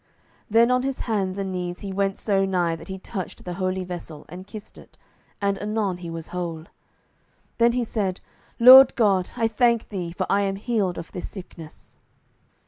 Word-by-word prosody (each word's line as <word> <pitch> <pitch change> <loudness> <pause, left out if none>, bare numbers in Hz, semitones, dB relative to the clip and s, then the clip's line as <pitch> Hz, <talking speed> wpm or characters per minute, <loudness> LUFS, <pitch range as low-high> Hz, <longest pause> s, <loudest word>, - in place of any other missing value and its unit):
Then 230 +3 +4
on 250 0 +3
his 270 0 -3
hands 195 -4 -1
and 195 -1 -3
knees 180 -1 -4
he 195 -1 -5
went 195 0 0
so 195 -2 +1
nigh 180 -3 0
that 165 - -12
he 190 -1 -5
touched 190 0 -7
the 180 - -4
holy 185 +1 -2
vessel, 175 -4 -8
and 180 +3 -9
kissed 210 0 -10
it, - - -18 0.4
and 200 -1 0
anon 210 -3 -1
he 175 -1 -8
was 165 0 -7
whole. 170 -3 -4 0.9
Then 235 0 +4
he 250 0 0
said, 200 -5 -2 0.4
"Lord 260 +2 +10
God, 195 -6 +2
I 225 - +2
thank 235 0 +1
thee, 180 -5 -4
for 185 +2 -3
I 200 - +2
am 195 -1 -1
healed 200 -4 -1
of 170 - -8
this 180 - -6
sickness." 170 -5 -12
195 Hz, 185 wpm, -24 LUFS, 180-220 Hz, 0.9 s, Lord